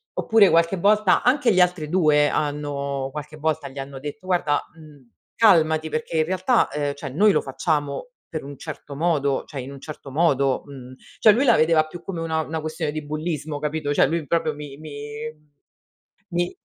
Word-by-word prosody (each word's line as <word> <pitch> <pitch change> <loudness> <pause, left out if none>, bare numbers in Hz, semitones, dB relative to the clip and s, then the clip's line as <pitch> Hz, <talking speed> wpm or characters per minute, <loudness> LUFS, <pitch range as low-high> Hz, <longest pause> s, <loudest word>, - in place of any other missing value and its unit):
oppure 220 -4 +4
qualche 170 +3 +3
volta 205 +2 +3
anche 250 -2 +3
gli 185 - +4
altri 180 -3 +1
2 150 -4 +4
hanno 140 -2 -2
qualche 150 +1 -7
volta 155 -2 -1
gli 135 +1 -9
hanno 135 0 -7
detto: 145 +5 -8
"Guarda, 170 -5 +1
uhm, 150 -6 -16 0.3
calmati 160 -7 +4
perché 155 +1 -3
in 155 - +3
realtà, 185 +7 +2
ehm, 145 -1 -1
cioè 140 -1 -6
noi 205 +11 +4
lo 155 - +2
facciamo 145 - -2 0.2
per 155 - -5
un 140 0 -9
certo 150 -1 -8
modo". 145 -3 +1
Cioè, 140 - -7
in 130 +2 -8
un 140 -1 -11
certo 150 -2 -9
modo 140 -3 +2
uhm, 130 -3 -11 0.3
cioè 215 - +7
lui 245 +6 +2
la 235 - +6
vedeva 155 0 +4
più 170 +2 -10
come 175 -4 -5
una 160 -1 -1
una 160 0 -4
questione 155 -1 -3
di 155 0 -5
bullismo 155 -1 -4
capito. 150 0 -2
Cioè - - +4
lui 165 +1 -2
proprio 165 +2 0
mi 145 -2 -9
mi 155 0 -10 1.4
mi 175 +1 -1
155 Hz, 185 wpm, -23 LUFS, 145-170 Hz, 1.4 s, cioè